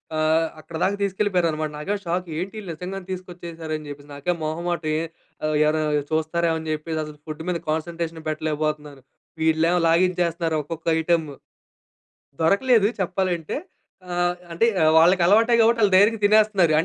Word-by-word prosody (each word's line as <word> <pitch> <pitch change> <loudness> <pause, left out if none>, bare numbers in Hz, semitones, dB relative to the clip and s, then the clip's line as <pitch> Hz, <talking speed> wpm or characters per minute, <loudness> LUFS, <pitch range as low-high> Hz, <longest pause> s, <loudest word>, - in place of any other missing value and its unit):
ఆహ్, 160 +1 +2
అక్కడిదాకా 170 +5 -2
తీసుకెళ్ళిపోయారనమాట. 180 -6 0
నాకేమో 195 +8 -3
షాక్ 175 +2 -1
ఏంటీళ్ళు 195 +2 -6
నిజంగానే 180 +3 -6
తీసుకొచ్చేసారు 170 -3 -7
అని 155 -1 -7
జెప్పేసి. 145 0 -10
నాకేం 175 +5 -1
మొహమాటం 165 +1 -2
ఏ - - 0 0.7
ఎవరైనా 155 0 +1 0.3
చూస్తారేమో 160 +1 0
అని 160 - -6
చెప్పేసి 155 +1 -4
అసలు 150 -1 -9
ఫుడ్ 155 0 -6
మీద 180 -1 0
కాన్సంట్రేషన్ 165 +1 -3
పెట్టలేకపోతున్నాను. 150 -2 -3 0.4
వీళ్ళేమో 160 +2 +3
లాగించేస్తున్నారు 170 -1 +1
ఒక్కొక్క 165 +2 -8
ఐటెమ్ము. 160 -3 0 1.1
దొరకలేదు 205 +4 +4
చెప్పాలంటే 180 -3 -1 0.6
ఆహ్, 175 0 +1 0.2
అంటే 170 +7 +2
ఆహ్, 155 0 +5
వాళ్ళకి 175 +2 +5
అలవాటే 225 +5 +4
కాబట్టి 230 +1 +4
వాళ్ళు 200 -2 +4
ధైర్యంగా 210 +3 +4
తినేస్తున్నారు 205 -5 +4
అం 165 - -1
170 Hz, 135 wpm, -23 LUFS, 155-185 Hz, 1.1 s, ఆహ్